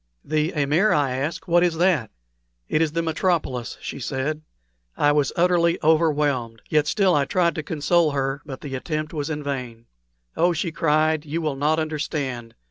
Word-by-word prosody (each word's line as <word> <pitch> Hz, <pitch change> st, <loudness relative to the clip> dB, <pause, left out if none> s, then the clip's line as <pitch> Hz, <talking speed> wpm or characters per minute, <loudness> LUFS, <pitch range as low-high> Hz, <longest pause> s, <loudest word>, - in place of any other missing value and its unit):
"The 155 Hz, +2 st, 0 dB
amir?" 150 Hz, +8 st, +2 dB
I 145 Hz, -3 st, +2 dB
asked; 135 Hz, +6 st, -3 dB
"what 175 Hz, 0 st, +4 dB
is 175 Hz, -2 st, +1 dB
that?" 170 Hz, -, +2 dB, 0.6 s
"It 155 Hz, -, +1 dB
is 155 Hz, -2 st, +1 dB
the 165 Hz, 0 st, 0 dB
metropolis," 160 Hz, -7 st, -1 dB
said 140 Hz, +3 st, -3 dB
she. -, -, -33 dB
I 145 Hz, -, +4 dB
was 145 Hz, -2 st, +2 dB
utterly 170 Hz, -1 st, +3 dB
overwhelmed, 145 Hz, -7 st, +1 dB
yet 150 Hz, -1 st, +2 dB
still 190 Hz, +2 st, +3 dB
I 145 Hz, -3 st, +2 dB
tried 170 Hz, +3 st, +1 dB
to 155 Hz, -, -3 dB
console 160 Hz, +2 st, +1 dB
her; 135 Hz, 0 st, -2 dB
but 135 Hz, -3 st, -8 dB
the 140 Hz, -2 st, -7 dB
attempt 155 Hz, +4 st, -3 dB
was 150 Hz, -1 st, -3 dB
vain. 135 Hz, -6 st, -4 dB, 0.5 s
"Oh!" 175 Hz, +1 st, +3 dB
she 170 Hz, +1 st, -2 dB
cried, 155 Hz, -1 st, +1 dB
"you 155 Hz, +2 st, -3 dB
will 155 Hz, -4 st, -2 dB
not 150 Hz, +3 st, +1 dB
understand. 145 Hz, -6 st, -3 dB
150 Hz, 170 wpm, -23 LUFS, 140-165 Hz, 0.6 s, what